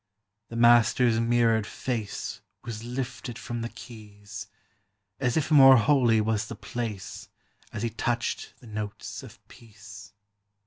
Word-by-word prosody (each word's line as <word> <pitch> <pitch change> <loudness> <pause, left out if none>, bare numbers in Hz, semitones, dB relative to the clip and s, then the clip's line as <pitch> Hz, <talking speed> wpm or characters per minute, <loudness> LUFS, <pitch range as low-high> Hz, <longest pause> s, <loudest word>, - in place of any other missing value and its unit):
The 115 - -8
Master's 120 0 +5
mirrored 115 -2 +2
fnee 115 -2 -4 0.3
\V;is 115 -2 -6
lilted 125 0 -5
from 120 -4 -5
the 115 - -3
keys, 105 -4 -10 0.7
As 125 0 0
it' 155 0 -1
more 135 -3 +9
holy 120 -3 +4
was 110 +1 0
the 115 - -7
place 105 -2 -6 0.4
A 105 +2 -3
Ik: 115 -1 -5
touched 120 +1 -2
the - - -15
notes 105 -2 -6
of - - -15
peace. 105 -2 -14
115 Hz, 130 wpm, -27 LUFS, 105-120 Hz, 0.7 s, more